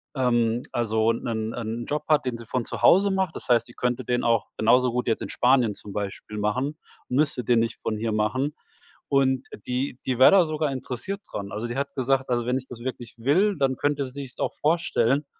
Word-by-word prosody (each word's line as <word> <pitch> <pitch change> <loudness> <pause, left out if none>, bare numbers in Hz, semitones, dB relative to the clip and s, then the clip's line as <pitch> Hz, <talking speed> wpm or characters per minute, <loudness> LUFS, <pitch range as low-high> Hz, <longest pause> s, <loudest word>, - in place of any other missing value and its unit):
ähm, 120 -2 +1
also 110 -1 +2
'nen 115 -1 -3
'en 115 0 -4
Job 150 0 -2
hat, 150 -3 +3
den 125 -2 -2
sie 115 - -10
von 125 +1 -2
zu - - -6
Hause 200 +3 +6
macht. 190 -3 0
Das - - -7
heißt, 120 0 +3
die 120 - -13
könnte 125 +1 -1
den 125 +1 -1
auch 115 -2 +2
genauso 125 +3 +4
gut 125 +1 -2
jetzt 115 - +1
in - - -5
Spanien 125 -4 +3
zum 100 0 -10
Beispiel 105 +1 -5
machen 130 +9 -1 0.3
und 125 - -3
müsste 145 -4 +1
den 120 -2 +4
nicht 115 0 -2
von 110 - -2
hier 110 +1 -2
machen. 130 +8 0 0.5
Und, 130 -2 +2
äh, - - -8
die 125 +1 -2
die 130 -2 -1
wär 130 - +9
da 195 -2 +7
sogar 155 -2 -1
interessiert 130 - -5
dran. 100 -1 -5
Also 110 +3 -3
die 120 +3 -5
hat 140 0 -3
gesagt, 130 0 +1
also 120 -1 0
wenn 125 +1 +1
ich 130 0 -7
das 120 -2 -9
wirklich 120 -3 -6
will, 180 - +2
dann 135 -2 +1
könnte 145 -1 0
sie 130 - -6
sich's 135 -2 -8
auch - - -1
vorstellen, 150 -4 +1
125 Hz, 225 wpm, -25 LUFS, 115-140 Hz, 0.5 s, wär